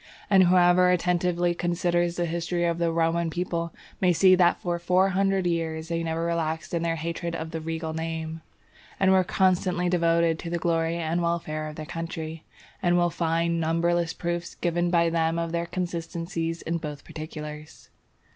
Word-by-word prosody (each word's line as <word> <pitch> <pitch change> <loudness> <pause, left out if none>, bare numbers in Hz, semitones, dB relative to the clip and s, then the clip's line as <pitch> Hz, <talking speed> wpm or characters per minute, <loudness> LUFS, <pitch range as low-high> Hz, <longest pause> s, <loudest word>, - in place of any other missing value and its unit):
And 195 -1 +7
whosoever 180 0 +5
attentively 175 0 +1
considers 175 0 0
the 175 - 0
history 170 +1 -1
of 170 0 0
the 170 -1 +1
Roman 165 0 +1
people, 170 0 -2 0.3
may 180 -1 +4
see 185 +2 +6
that 180 -1 +4
for 175 -1 -2
four 180 +2 +3
hundred 195 0 +1
years 165 -1 -2
they 165 0 -1
never 165 0 -2
relaxed 165 0 -2
in 170 - 0
their 165 0 0
hatred 170 +1 -4
of 160 0 -5
the 160 - -4
regal 160 0 -4
name, 160 0 -4 0.6
and 190 -1 +4
were 190 -1 +5
constantly 180 -1 +1
devoted 170 -2 +2
to 170 - -5
the 170 - -1
glory 165 0 0
and 170 +1 -1
welfare 165 -2 -2
of 150 - -8
their 155 - -6
country, 165 -1 -5 0.4
and 175 -1 +3
will 175 0 +2
find 165 +1 0
numberless 165 +1 +1
proofs 170 0 -4
given 175 0 0
by 170 -1 +3
them 165 0 +1
of 165 -1 -2
their 170 0 -2
consistency 170 -1 -3
in 170 +1 -1
both 150 -2 -7
particulars. 155 -1 -8
170 Hz, 175 wpm, -26 LUFS, 165-175 Hz, 0.6 s, And